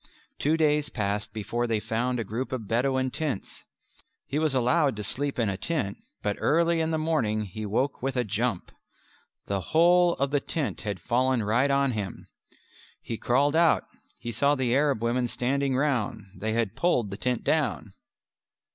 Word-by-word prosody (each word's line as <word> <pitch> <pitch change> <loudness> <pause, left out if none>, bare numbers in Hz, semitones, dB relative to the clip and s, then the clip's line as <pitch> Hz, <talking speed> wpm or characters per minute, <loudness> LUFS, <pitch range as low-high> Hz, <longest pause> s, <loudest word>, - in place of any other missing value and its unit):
Two 155 +3 +2
days 150 -2 +2
passed 105 -1 -2
before 120 +3 -2
they 115 -2 +1
found 120 +3 -1
a - - 0
group 115 +7 -4
of 120 -5 -4
Bedouin 130 +3 +1
tents. 145 -9 -4 0.6
He 145 - -2
was 155 -3 +1
allowed 135 +2 +3
to 105 - -5
sleep 140 +6 -2
in 115 -3 +1
a 100 -1 -1
tent: 110 - -2 0.3
but 105 -1 -1
early 170 +1 +2
in 160 - 0
the 160 - 0
morning 145 -10 0
he 105 +2 -6
woke 130 +7 -1
with 135 0 -2
a 125 - +2
jump. 110 -2 -2 0.7
The 100 -1 -1
whole 175 - +4
of 140 0 -1
the 145 - +3
tent 145 0 -3
had 100 -4 -3
fallen 125 +4 +1
right 120 +7 +2
on 140 -1 +2
him; 105 -4 -5 0.7
he 115 - -5
crawled 140 +5 +2
out. 165 0 +4 0.3
He 120 - -5
saw 140 +6 +2
the 130 -3 0
Arab 140 -4 +2
women 120 +1 +1
standing 135 +3 0
round; 120 -6 0
they 110 +4 -2
had 115 -2 0
pulled 125 - +1
the 100 - -5
tent 125 +1 -1
down. - - 0
125 Hz, 175 wpm, -27 LUFS, 110-145 Hz, 0.7 s, whole